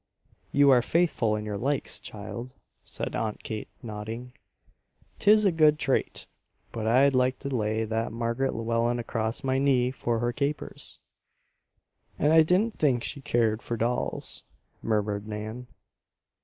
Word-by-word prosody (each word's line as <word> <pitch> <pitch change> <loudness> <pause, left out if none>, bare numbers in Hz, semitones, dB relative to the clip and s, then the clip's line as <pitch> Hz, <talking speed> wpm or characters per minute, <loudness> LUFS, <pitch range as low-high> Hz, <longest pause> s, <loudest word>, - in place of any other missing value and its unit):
"You 140 -1 +5
are 125 -2 +6
faithful 130 -7 +1
in 105 0 -4
your 105 -1 -3
likes, 140 +3 -1
child," 115 +5 -8 0.3
said - - -5
Aunt 110 -2 -3
Kate 110 -1 -5 0.2
nodding. 115 +3 -6 0.9
"'Tis 215 +1 +5
a 195 - +5
good 155 -2 +4
trait. 135 -3 -1 0.5
But 110 -1 -3
I'd 135 +4 +5
like 130 0 +2
to 140 - -5
lay 110 -1 0
that 110 +1 -2
Marg'ret 115 +3 -1
Llewellen 115 +1 0
across 115 -1 -3
my 130 0 +1
knee, 130 -3 +3
for 120 -3 -1
her 120 +1 -1
capers." 145 +2 -4 1.2
"And 150 +2 +3
I 160 - +8
didn't 190 +8 +1
think 130 -6 +2
she 140 - -5
cared 115 -5 +1
for 120 - -4
dolls," 120 +2 -1 0.4
murmured 105 -1 -1
Nan. 110 +3 -6
120 Hz, 140 wpm, -27 LUFS, 110-140 Hz, 1.2 s, I